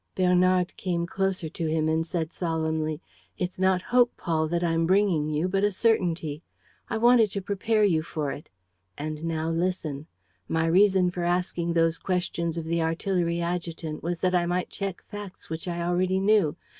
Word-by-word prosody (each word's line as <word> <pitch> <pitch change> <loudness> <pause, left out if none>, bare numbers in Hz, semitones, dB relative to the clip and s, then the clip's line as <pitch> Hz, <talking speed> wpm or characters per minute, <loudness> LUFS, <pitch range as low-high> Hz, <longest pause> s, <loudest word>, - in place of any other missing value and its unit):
Bernard 180 0 +3
came 175 -2 -1
closer 190 -1 -1
to 165 +1 -4
him 155 0 +1
and 160 +1 0
said, 165 -2 -3
solemnly: 160 -2 -2 0.4
"It's 180 0 -3
not 190 -1 +2
hope, 245 -1 +3
Paul, 160 -2 0
that 170 +2 -1
I'm 165 -1 +1
bringing 185 -5 +2
you, 155 +4 0
but 195 +2 0
a 205 - +3
certainty. 175 -8 0 0.5
I - - -1
wanted 235 -1 +5
to 200 - -1
prepare 210 +3 +1
you 170 -6 +3
for 155 -3 -3
it. 145 - -9 0.5
And 155 +1 -5
now 165 -1 -1
listen. 165 -4 -2 0.4
My 160 0 +1
reason 185 +1 +4
for 175 -1 -4
asking 175 -1 0
those 165 -1 +2
questions 170 -2 -2
of 165 - -3
the 170 +1 0
artillery 170 +1 0
adjutant 170 -2 -3
was 170 0 -3
that 185 -1 +2
I 175 -1 +2
might 180 +1 -1
check 195 -3 -4
facts 205 -5 -10
which 160 +2 -4
I 170 -1 -2
already 180 +2 +1
knew. 195 -6 +3
175 Hz, 175 wpm, -26 LUFS, 160-185 Hz, 0.5 s, wanted